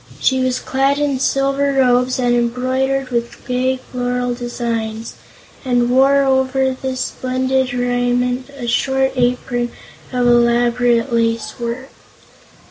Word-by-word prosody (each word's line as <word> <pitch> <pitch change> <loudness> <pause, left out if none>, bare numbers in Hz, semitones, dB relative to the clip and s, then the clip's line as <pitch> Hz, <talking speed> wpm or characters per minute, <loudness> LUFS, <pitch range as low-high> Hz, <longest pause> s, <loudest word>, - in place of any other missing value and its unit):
She 260 -1 +2
was 255 0 0
clad 270 +1 0
in 290 -3 0
silver 275 +1 +1
robes 250 -1 +2
embroidered 255 +2 0
with 235 -1 -3
gay 255 +1 0
floral 245 -1 -3
designs, 230 -2 -4 0.5
and 245 -2 +1
wore 275 +2 +4
over 265 0 +1
this 260 0 -4
splendid 260 0 -1
raiment 245 +1 0
a 275 -3 -8
short 265 +3 +1
apron 245 -1 0 0.4
of 250 -1 0
elaborate 240 0 +3
lace 230 0 0
work. 240 +3 -4
250 Hz, 115 wpm, -18 LUFS, 240-265 Hz, 0.5 s, wore